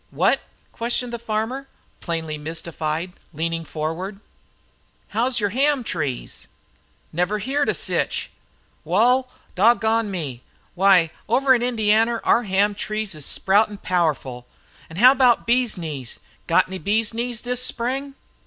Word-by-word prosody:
"Whet?" - - +2 0.3
questioned 240 +1 -2
the 235 - -3
farmer, 230 +4 -3 0.3
plainly 165 -3 -3
mystified, 160 +2 -4 0.2
leaning 165 +2 -2
forward. 165 +6 -4 0.9
"How's 240 +3 +1
yer 205 -1 +1
ham 275 +4 +1
trees?" 145 - -4 0.7
"Never 180 +6 0
heerd 275 +6 0
of - - 0
sich." - - -1 0.5
"Wal, 245 +10 +3 0.2
dog 225 +6 +4
gone 220 -1 +1
me! 145 -10 -4 0.3
Why, 185 -3 +4 0.2
over 265 +3 +4
in 245 - +2
Indianer 225 -1 +2
our 235 - +4
ham 200 +1 +2
trees 215 0 -3
is 150 -3 -4
sproutin' 205 +2 +2
powerful. 150 -8 -1 0.4
An' 160 - -10
how 250 +5 +8
about 255 -3 +3
bee's 240 -2 +2
knees? 145 -8 -5 0.3
Got - - +4
any 190 0 -6
bee's 215 +3 +1
knees 235 0 -3
this 250 0 -1
Spring?" 265 +4 -2
210 Hz, 135 wpm, -22 LUFS, 165-240 Hz, 0.9 s, how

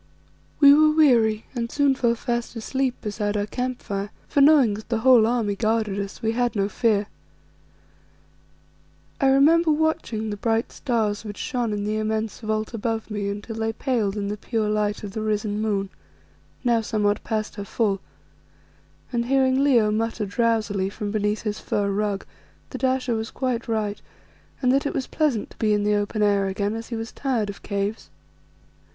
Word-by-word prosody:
We 280 -1 +9
were 310 +1 +6
weary 240 -9 +3
and 235 -2 -3
soon 285 -2 +3
fell 235 -3 +1
fast 235 +1 -3
asleep 260 +3 -1
beside 210 0 -2
our 205 - 0
camp 250 +3 -4
fire, 200 0 -3 0.2
for, 285 - +2
knowing 275 -7 +6
that 215 +2 -8
the 230 - +1
whole 240 -3 +6
army 225 -4 0
guarded 215 -2 0
us, 200 +2 -6
we 220 - +2
had 240 -1 0
no 200 -1 +1
fear. 210 -1 +1 2.1
I 275 - +3
remember 310 +5 +5
watching 295 -8 0
the 205 - -4
bright 225 +2 0
stars 225 -6 -1
which 205 -2 -7
shone 245 -5 -2
in 205 -1 -2
the 210 +1 -1
immense 215 0 -2
vault 215 0 -2
above 225 0 -3
me 205 -1 -2
until 205 +3 -6
they 225 0 -1
paled 220 -5 -1
in 200 -1 -2
the 210 +1 -3
pure 220 0 -1
light 210 0 -1
of 205 - -5
the 220 +2 -4
risen 210 -1 -1
moon, 200 -3 -1 0.7
now 235 -2 +3
somewhat 210 -2 0
past 215 -2 -2
her 200 - -4
full, 200 -1 -1 1.1
and 235 0 0
hearing 265 0 +3
Leo 235 -7 +4
mutter 225 0 -1
drowsily 205 -2 0
from 205 0 -5
beneath 210 0 -1
his 210 -1 -3
fur 200 -1 -1
rug 200 0 -1 0.5
that - - -7
Ayesha 260 -2 +1
was 220 0 -3
quite 250 -3 -2
right, 215 -2 -2 0.6
and 250 - +4
that 275 +1 +2
it - - -4
was 265 - -1
pleasant 285 -9 -1
to - - -16
be 215 -1 +2
in 205 0 +1
the 210 0 +2
open 205 +1 0
air 200 -1 +2
again, 200 +2 -1
as 225 0 -6
he 235 - -4
was 225 +1 -5
tired 235 -7 -1
of 200 - -14
caves. 200 - -3
220 Hz, 180 wpm, -24 LUFS, 205-245 Hz, 2.1 s, We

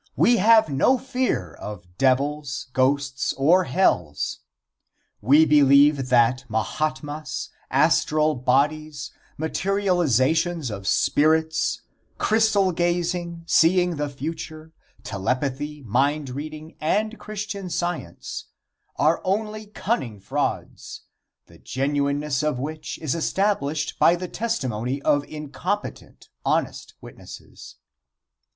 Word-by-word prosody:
We 240 0 +4
have 220 +1 +5
no 150 - +3
fear 260 0 -2
of 100 -4 -9
devils, 135 +1 0
ghosts 135 0 +1
or 170 +7 +3
hells. 90 - 0 0.8
We 145 +8 +5
believe 140 -2 +5
that 125 +1 +3
Mahatmas, 150 +7 -3 0.2
astral 155 0 +3
bodies, 140 +2 0 0.3
materializations 165 - +1
of 100 -2 -6
spirits, 160 +5 +2 0.3
crystal 215 -3 +2
gazing, 175 0 -1
seeing 175 0 +3
the 145 0 -2
future, 155 +2 -7 0.3
telepathy, 130 +6 -3
mind 135 +5 0
reading 155 +4 -8
and 215 +8 0
Christian 205 -3 -5
Science 175 - -4 0.5
are 155 +2 +2
only 215 +2 -2
cunning 185 - -3
frauds, 95 - -4 0.4
the - - -19
genuineness 140 +1 -1
of 150 -4 0
which 155 +4 -5
is 150 - 0
established 160 -4 -1
by 170 - +5
the 180 +1 -5
testimony 130 - -2
of 145 -1 +2
incompetent, 155 +7 -5
honest - - -1
witnesses. - - -12
150 Hz, 95 wpm, -24 LUFS, 135-175 Hz, 0.8 s, have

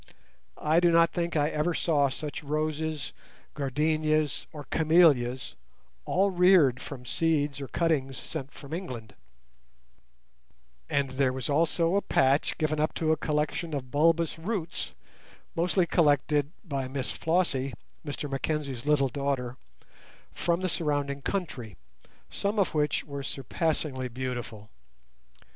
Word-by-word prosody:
I 155 +2 +3
do 175 0 +4
not 165 0 +5
think 170 -1 -2
I 150 -1 +3
ever 155 +3 0
saw 145 -4 +2
such 150 +2 -5
roses, 155 +1 -2 0.4
gardenias, 155 +1 0
or 150 -2 -8
camellias 140 - +3 0.5
(all 195 +2 +2
reared 180 -8 +5
from 125 -3 -8
seeds 145 0 0
or 135 - -5
cuttings 140 -6 0
sent 140 -4 -6
from 140 +2 -10
England); 125 - -6 1.8
and 140 -2 +1
there 130 0 +2
was 130 +2 -3
also 165 +3 +2
a 200 - +3
patch 135 -3 +2
given 155 -1 0
up 155 - 0
to 160 -1 +1
a - - +4
collection 155 +1 -1
of 130 -3 -5
bulbous 165 +2 +2
roots 175 -2 -3 0.6
mostly 175 +1 +2
collected 150 -2 +2
by 140 -7 -3
Miss 130 0 -3
Flossie, 160 -6 0 0.3
Mr 145 0 -4
Mackenzie's 140 -2 -3
little 140 -3 +3
daughter, 130 -2 -2 0.8
from 170 +1 0
the 185 - 0
surrounding 145 -4 -1
country, 135 - -4 0.5
some 200 +2 -1
of 195 -4 +2
which 150 -2 +1
were 140 -1 -6
surpassingly 135 0 -2
beautiful. 120 -4 -5
150 Hz, 125 wpm, -28 LUFS, 135-165 Hz, 1.8 s, not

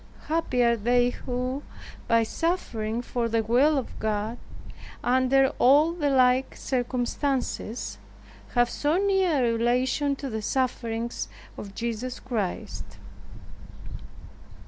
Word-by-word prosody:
Happy 310 -6 +1
they 245 +2 +2
who 255 +2 -3 0.5
by 230 0 +4
suffering 235 -7 -2
for 240 -1 -2
the 225 0 +1
will 265 +7 +3
of 260 - -4
God 215 +2 -2 0.6
under 260 +2 +4
all 290 +6 +6
the 320 -4 -1
like 255 -1 +3
circumstances, 250 -1 -2 0.6
have 240 0 +4
so 295 +6 0
near 380 -8 +2
a 230 - +2
relation 255 +5 +1
to 275 - -6
the 220 -4 -3
sufferings 235 -1 -2 0.3
of 200 -1 -9
Jesus 235 +2 -3
Christ! 220 -8 -4
250 Hz, 105 wpm, -26 LUFS, 230-275 Hz, 0.6 s, all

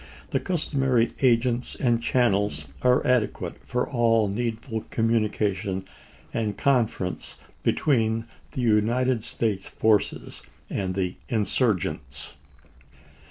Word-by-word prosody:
The - - +2
customary 135 -9 +1
agents 120 -1 +2
and 120 -3 +1
channels 105 -5 +1 0.2
are 125 0 +3
adequate 125 -4 0
for 125 - -1
all 115 -4 +3
need 115 +3 -1
ful 110 -3 -4
communication 105 -4 0 0.5
and 105 -3 -1
conference 115 -9 0 0.2
between 115 -6 +1 0.3
the 135 - -2
United 120 +2 +2
States 110 -4 -1
forces 110 -2 0 0.3
and 95 -2 -2
the 90 -2 -1
insurgents. 110 -2 -1
115 Hz, 100 wpm, -26 LUFS, 105-125 Hz, 0.5 s, are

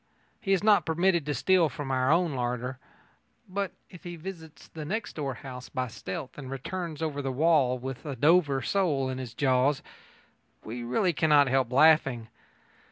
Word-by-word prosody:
He 195 - -3
is 195 0 +2
not 210 -1 +5
permitted 170 -1 +1
to 145 - 0
steal 185 -4 +3
from 135 +2 -5
our 130 +1 +2
own 170 -1 +2
larder. 125 0 -3 0.7
But 195 -1 -3
if 180 - -14
he 175 -1 -6
visits 160 -3 -10
the 155 - -8
next 205 +8 -3
door 140 -4 -3
house 130 -1 -9
by 130 -3 -3
stealth 150 +5 -7
and 135 -3 -8
returns 160 +4 -5
over 145 -3 -2
the 135 -1 -2
wall 140 -3 +3
with 130 +1 -6
a 145 -4 -5
Dover 145 0 +3
sole 150 -9 +1
in 130 0 -4
his 120 -3 -7
jaws, 135 +1 +2 0.8
we 120 +3 -6
really 175 - +1
cannot 150 -3 +4
help 130 -2 +1
laughing. 135 -5 +4
145 Hz, 170 wpm, -28 LUFS, 130-170 Hz, 0.8 s, not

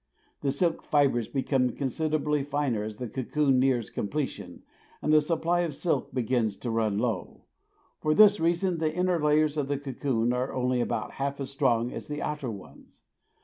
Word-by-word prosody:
The 140 - 0
silk 165 +4 0
fibres 135 -6 +2
become 130 -2 +1
considerably 150 +2 -1
finer 140 -5 -1
as 105 0 -6
the 125 - -4
cocoon 135 +3 +1
nears 130 -3 +1
completion 140 +7 -4 0.4
and 150 - +1
the 155 - +7
supply 165 +2 0
of 165 -5 -1
silk 155 -6 -1
begins 120 -4 0
to 120 - -4
run 110 -3 0
low. 115 +1 -3 0.6
For 155 0 +1
this 210 -1 +7
reason 170 +1 +1
the 155 -1 +1
inner 180 -1 0
layers 150 0 +3
of 145 -2 0
the 145 0 -1
cocoon 130 -3 -1
are 125 +1 -2
only 125 -1 +1
about - - -2
half 140 +1 -3
as 135 - -5
strong 125 -4 +1
as - - -7
the 150 0 -4
outer 150 -4 -3
ones. 100 -4 -12
140 Hz, 175 wpm, -28 LUFS, 125-155 Hz, 0.6 s, the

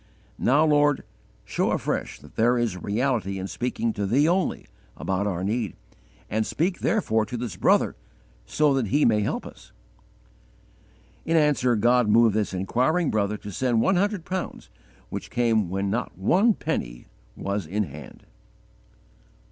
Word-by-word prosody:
Now, 145 +5 +4
Lord, 145 -2 +3 0.4
show - - 0
afresh - - -2
that - - -16
there 120 +2 +3
is 120 -5 0
reality 105 0 -1
in 95 - -4
speaking 115 0 -2
to 100 -1 -2
Thee 140 +9 +3
only, 180 +2 0 0.3
about 95 +2 -1
our 90 -2 -2
need, 105 -1 -2 0.5
and 110 +2 0
speak 175 - -1
therefore 110 - +1
to 120 - -5
this 115 -5 -4
brother - - +2 0.5
so 150 - +2
that 130 -5 0
he 145 +9 +2
may 105 -2 +3
help - - -2
us." - - -13 1.5
In 165 0 +1
answer, 145 -5 +3
God 120 +1 +3
moved 115 0 +5
this 110 -2 0
inquiring 130 - 0
brother 105 -1 0
to 105 - -9
send 120 +3 +1
one 190 +6 +3
hundred 200 -2 0
pounds, 185 -1 -5 0.4
which - - -6
came 115 -6 +1
when 95 +1 -1
_not 120 +3 -1
one 190 - +3
penny - - -4 0.3
was 100 -4 -3
in 105 +6 0
hand. 75 -4 -10
115 Hz, 150 wpm, -25 LUFS, 100-145 Hz, 1.5 s, moved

